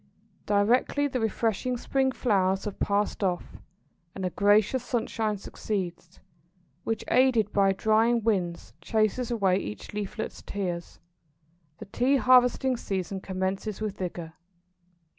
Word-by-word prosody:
Directly 235 Hz, +7 st, +2 dB
the 255 Hz, -2 st, -2 dB
refreshing 225 Hz, +2 st, -1 dB
spring 265 Hz, +2 st, +1 dB
showers 195 Hz, -6 st, +1 dB
have 210 Hz, -, -5 dB
passed 205 Hz, +1 st, 0 dB
off, 180 Hz, -2 st, -2 dB, 0.6 s
and 190 Hz, -, -3 dB
a 180 Hz, -, -1 dB
gracious 205 Hz, +7 st, +3 dB
sunshine 225 Hz, -3 st, -1 dB
succeeds, 185 Hz, -4 st, -5 dB, 0.6 s
which, 225 Hz, -, -2 dB
aided 245 Hz, -5 st, +3 dB
by 195 Hz, -1 st, +4 dB
drying 220 Hz, +3 st, +2 dB
winds, 185 Hz, -6 st, -1 dB
chases 220 Hz, +5 st, 0 dB
away 195 Hz, -6 st, +2 dB
each 105 Hz, -, -6 dB
leaflet's 210 Hz, +1 st, -5 dB
tears, 180 Hz, -4 st, -5 dB, 0.8 s
the -, -, -9 dB
Tea 250 Hz, +7 st, +1 dB
harvesting 255 Hz, +1 st, +4 dB
season 190 Hz, -2 st, -3 dB
commences 190 Hz, +2 st, -3 dB
with 215 Hz, -2 st, -3 dB
vigour. 170 Hz, -3 st, -5 dB
210 Hz, 120 wpm, -27 LUFS, 190-235 Hz, 0.8 s, by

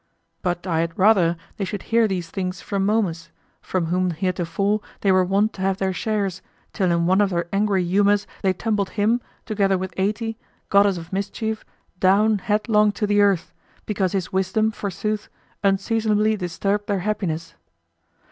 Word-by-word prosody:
But 175 Hz, 0 st, -2 dB
I 165 Hz, -3 st, 0 dB
had 165 Hz, 0 st, -2 dB
rather 185 Hz, -4 st, +4 dB, 0.2 s
they 200 Hz, -, -2 dB
should 195 Hz, 0 st, -4 dB
hear 230 Hz, -1 st, +5 dB
these 180 Hz, -4 st, -3 dB
things 185 Hz, -1 st, -3 dB
from 200 Hz, -1 st, -2 dB
Momus, 180 Hz, -6 st, 0 dB, 0.3 s
from 185 Hz, -3 st, -1 dB
whom 180 Hz, +2 st, +1 dB
heretofore 185 Hz, +4 st, -1 dB, 0.2 s
they 195 Hz, -, +3 dB
were 185 Hz, 0 st, +4 dB
wont 200 Hz, +4 st, +1 dB
to 190 Hz, -, -8 dB
have 190 Hz, 0 st, +1 dB
their 190 Hz, -1 st, -1 dB
shares, 195 Hz, -1 st, -2 dB, 0.3 s
till 185 Hz, -3 st, +1 dB
in 170 Hz, 0 st, +2 dB
one 190 Hz, +3 st, +4 dB
of 205 Hz, -, +3 dB
their 170 Hz, -2 st, -1 dB
angry 200 Hz, -2 st, +2 dB
humors 200 Hz, +3 st, +3 dB, 0.2 s
they 190 Hz, -, +3 dB
tumbled 205 Hz, +1 st, -1 dB
him, 225 Hz, +4 st, +2 dB, 0.2 s
together 195 Hz, -3 st, +1 dB
with 185 Hz, -1 st, -5 dB
Ate, 215 Hz, +4 st, -1 dB, 0.3 s
goddess 200 Hz, -1 st, +4 dB
of 165 Hz, +2 st, -9 dB
mischief, 215 Hz, +3 st, -3 dB, 0.4 s
down 205 Hz, +3 st, +4 dB
headlong 210 Hz, +1 st, +2 dB
to 210 Hz, -, -1 dB
the 205 Hz, 0 st, +3 dB
earth, 195 Hz, -4 st, +2 dB, 0.3 s
because 195 Hz, -3 st, -1 dB
his 190 Hz, -2 st, -2 dB
wisdom, 190 Hz, +4 st, +1 dB
forsooth, 205 Hz, +1 st, -3 dB, 0.3 s
unseasonably 215 Hz, +2 st, +2 dB
disturbed 200 Hz, +2 st, -2 dB
their 200 Hz, -3 st, 0 dB
happiness. 170 Hz, -6 st, -2 dB
195 Hz, 165 wpm, -23 LUFS, 185-210 Hz, 0.4 s, hear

